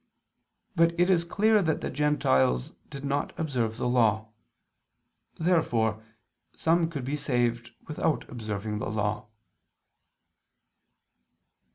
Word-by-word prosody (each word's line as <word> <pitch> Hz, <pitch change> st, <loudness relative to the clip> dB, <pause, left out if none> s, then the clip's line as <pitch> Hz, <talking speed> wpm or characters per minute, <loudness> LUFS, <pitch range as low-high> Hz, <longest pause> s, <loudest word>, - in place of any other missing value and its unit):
But 170 Hz, 0 st, +2 dB
it 180 Hz, +2 st, +4 dB
is 170 Hz, -2 st, +3 dB
clear 210 Hz, +5 st, +3 dB
that 160 Hz, -4 st, 0 dB
the -, -, -3 dB
Gentiles 65 Hz, -, +1 dB, 0.2 s
did 140 Hz, 0 st, -7 dB
not 140 Hz, +1 st, -2 dB
observe 120 Hz, -8 st, -1 dB
the -, -, -1 dB
Law. 110 Hz, -3 st, +2 dB, 1.1 s
Therefore 115 Hz, -, +1 dB, 0.5 s
some 165 Hz, 0 st, +2 dB
could 140 Hz, -6 st, -5 dB
be 140 Hz, +3 st, -2 dB
saved 120 Hz, -5 st, -1 dB, 0.2 s
without 155 Hz, 0 st, -1 dB
observing 105 Hz, -2 st, -4 dB
the -, -, -3 dB
Law. 105 Hz, 0 st, -2 dB
130 Hz, 105 wpm, -27 LUFS, 110-160 Hz, 1.1 s, it